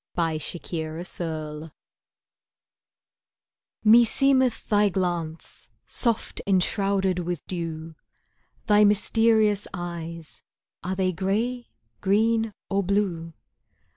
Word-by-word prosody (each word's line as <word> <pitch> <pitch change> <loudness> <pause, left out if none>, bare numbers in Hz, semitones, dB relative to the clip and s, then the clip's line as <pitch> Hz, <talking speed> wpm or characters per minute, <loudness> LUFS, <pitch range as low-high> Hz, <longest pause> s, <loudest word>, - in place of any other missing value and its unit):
Overcast 165 0 -2 0.4
Sky 155 -2 -5 2.1
Meseemeth 240 +3 +4
thy 205 -1 +3
glance, 175 -3 -3 0.2
soft 230 -3 -1
enshrouded 195 0 +1
with 175 -2 -4
dew, 165 -2 -5 0.7
Thy 210 -1 +5
mysterious 210 0 +3
eyes 170 -2 -7 0.4
(are 185 +2 -2
they 185 -1 +1
grey, 215 +7 -1 0.3
green 220 +3 +2 0.2
or 195 0 +1
blue?) 180 -4 -1
190 Hz, 75 wpm, -25 LUFS, 170-210 Hz, 2.1 s, Thy